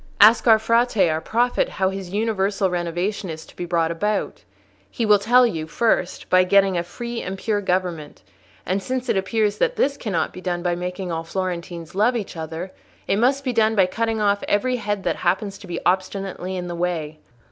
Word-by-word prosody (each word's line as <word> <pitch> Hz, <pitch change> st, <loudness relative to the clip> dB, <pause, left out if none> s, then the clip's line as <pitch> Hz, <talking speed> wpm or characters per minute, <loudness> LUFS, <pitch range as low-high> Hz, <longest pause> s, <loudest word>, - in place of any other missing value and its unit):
Ask 220 Hz, +4 st, +7 dB
our 220 Hz, -1 st, +8 dB
Frate, 230 Hz, -4 st, +2 dB
our 155 Hz, +1 st, -1 dB
prophet, 240 Hz, +8 st, +1 dB
how 190 Hz, 0 st, 0 dB
his 195 Hz, -2 st, -6 dB
universal 200 Hz, -2 st, 0 dB
renovation 175 Hz, +3 st, -2 dB
is 160 Hz, 0 st, -7 dB
to -, -, -18 dB
be 175 Hz, -, -4 dB
brought 165 Hz, -1 st, +1 dB
about: 210 Hz, +5 st, -2 dB, 0.5 s
he 230 Hz, -, -2 dB
will 210 Hz, -1 st, +5 dB
tell 245 Hz, +5 st, +5 dB
you, 160 Hz, -9 st, -2 dB
first, 185 Hz, 0 st, 0 dB
by 185 Hz, 0 st, +5 dB
getting 195 Hz, 0 st, +3 dB
a 170 Hz, -, +1 dB
free 235 Hz, +7 st, -6 dB
and 190 Hz, +1 st, -5 dB
pure 205 Hz, +1 st, -1 dB
government; 180 Hz, -5 st, -2 dB, 0.4 s
and 190 Hz, +2 st, -1 dB
since 255 Hz, +2 st, -3 dB
it 230 Hz, -, +2 dB
appears 205 Hz, +2 st, 0 dB
that -, -, +1 dB
this 280 Hz, 0 st, +1 dB
cannot 200 Hz, -8 st, -2 dB
be 185 Hz, -, -9 dB
done 175 Hz, -2 st, -2 dB
by 175 Hz, -1 st, +1 dB
making 180 Hz, +1 st, -4 dB
all 165 Hz, 0 st, -2 dB
Florentines 175 Hz, -2 st, -4 dB
love 215 Hz, +6 st, +2 dB
each 215 Hz, -6 st, -4 dB
other, 165 Hz, +3 st, -6 dB, 0.4 s
it 195 Hz, -, +2 dB
must 270 Hz, +4 st, +2 dB
be 255 Hz, -2 st, -1 dB
done 220 Hz, -1 st, +3 dB
by 195 Hz, -3 st, +5 dB
cutting 225 Hz, +4 st, -1 dB
off 200 Hz, -1 st, +2 dB
every 250 Hz, +5 st, +1 dB
head 205 Hz, -3 st, -3 dB
that -, -, -1 dB
happens 195 Hz, +2 st, -1 dB
to 200 Hz, -, -12 dB
be 175 Hz, -1 st, -4 dB
obstinately 190 Hz, 0 st, -1 dB
in 180 Hz, -, -4 dB
the 175 Hz, -, -5 dB
way. 165 Hz, -3 st, -3 dB
195 Hz, 200 wpm, -22 LUFS, 175-220 Hz, 0.5 s, our